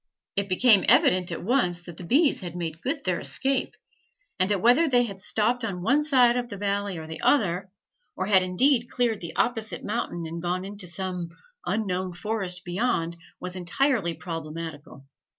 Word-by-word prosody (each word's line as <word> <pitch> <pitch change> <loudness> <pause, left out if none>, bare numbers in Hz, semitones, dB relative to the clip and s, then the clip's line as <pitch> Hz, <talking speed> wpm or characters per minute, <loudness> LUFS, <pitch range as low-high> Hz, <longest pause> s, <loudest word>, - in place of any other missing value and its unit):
It 200 0 -1
became 205 +2 +5
evident 180 -1 +4
at - - -5
once 180 -6 +1
that 175 -1 -10
the - - -8
bees 275 - +3
had 175 -2 -6
made 165 -2 -5
good 280 +3 -2
their 180 -2 0
escape, 260 - 0 0.6
and 185 +1 +2
that 205 -2 +1
whether 245 - +5
they 245 -3 +4
had 200 -5 -6
stopped 230 +4 +1
on 185 -5 -3
one 280 +8 +3
side 255 -5 +4
of 245 -1 -3
the 200 - -6
valley 200 -1 -1
or 160 - -7
the 160 0 -7
other, 190 -7 +2 0.5
or 185 - -2
had 190 -2 +5
indeed 240 +7 +2
cleared 235 -4 0
the 170 - -7
opposite 225 -2 -1
mountain 205 -6 -3
and 165 +1 -5
gone 180 +2 -2
into 200 -1 -5
some 180 -1 -4 0.4
unknown 185 -4 -1
forest 185 -2 -3
beyond, 175 -3 -1 0.2
was 180 0 -6
entirely 185 - 0
problematical. 160 -4 -7
190 Hz, 175 wpm, -26 LUFS, 175-235 Hz, 0.6 s, became